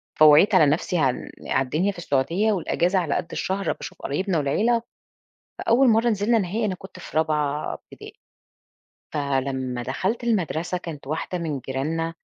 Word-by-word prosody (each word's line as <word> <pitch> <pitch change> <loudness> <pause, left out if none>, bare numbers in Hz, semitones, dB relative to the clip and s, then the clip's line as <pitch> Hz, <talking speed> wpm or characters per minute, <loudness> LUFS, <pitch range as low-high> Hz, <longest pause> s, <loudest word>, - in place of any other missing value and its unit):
فوعيت 155 +7 +7
على 155 - +7
نفْسي 155 +4 +1
عال 135 -6 0 0.2
على 135 - +1
الدنيا 170 +10 0
في - - -14
السعودية، 170 +7 +1
والأجازة 180 0 +1
على 160 -5 -1
قد 170 - -2
الشهر 195 +1 -1
باشوف - - -10
قرايبنا 180 +5 -1
والعيلة. 220 +12 +2 0.8
فأول 250 +3 +4
مرة 225 +2 +4
نزِلنا 220 +2 +2
نهائي 210 +4 -1
أنا 190 -3 0
كنت 185 0 -12
في 165 - -10
رابعة 150 -2 0
ابتدائي، - - -13 1.0
فلمّا 130 -3 -1
دخَلت 190 - -2
المدرسة 180 -5 0
كانت 155 -6 -8
واحدة 160 +4 -3
من 155 -5 -3
جيراننا 160 +6 -2
165 Hz, 150 wpm, -24 LUFS, 145-200 Hz, 1.0 s, فوعيت